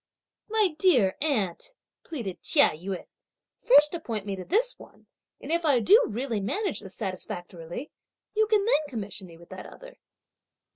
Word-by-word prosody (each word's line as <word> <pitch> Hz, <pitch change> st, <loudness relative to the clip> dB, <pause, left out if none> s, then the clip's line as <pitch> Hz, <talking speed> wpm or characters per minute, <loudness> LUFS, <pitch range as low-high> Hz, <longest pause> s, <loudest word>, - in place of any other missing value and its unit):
"My 430 Hz, -3 st, +3 dB
dear 250 Hz, -, +4 dB
aunt," 280 Hz, -, -1 dB, 0.3 s
pleaded 235 Hz, -, -6 dB
Chia 285 Hz, -2 st, +4 dB
Yün, 180 Hz, +4 st, -6 dB, 0.6 s
"first 300 Hz, -9 st, +6 dB
appoint 230 Hz, -, -4 dB
me 200 Hz, -1 st, -3 dB
to 185 Hz, -, -7 dB
this 470 Hz, -, +1 dB
one, -, -, -16 dB, 0.3 s
and -, -, -7 dB
if 340 Hz, +1 st, +1 dB
I 285 Hz, -6 st, +4 dB
do 415 Hz, -, +6 dB
really 230 Hz, 0 st, -2 dB
manage 390 Hz, -, -2 dB
this 190 Hz, -1 st, -8 dB
satisfactorily, 180 Hz, -, -6 dB, 0.4 s
you 435 Hz, 0 st, +2 dB
can 420 Hz, -2 st, +2 dB
then 310 Hz, -10 st, +2 dB
commission 205 Hz, -6 st, -6 dB
me 165 Hz, -1 st, -14 dB
with 170 Hz, 0 st, -17 dB
that -, -, -9 dB
other!" -, -, -13 dB
260 Hz, 155 wpm, -27 LUFS, -, 0.6 s, first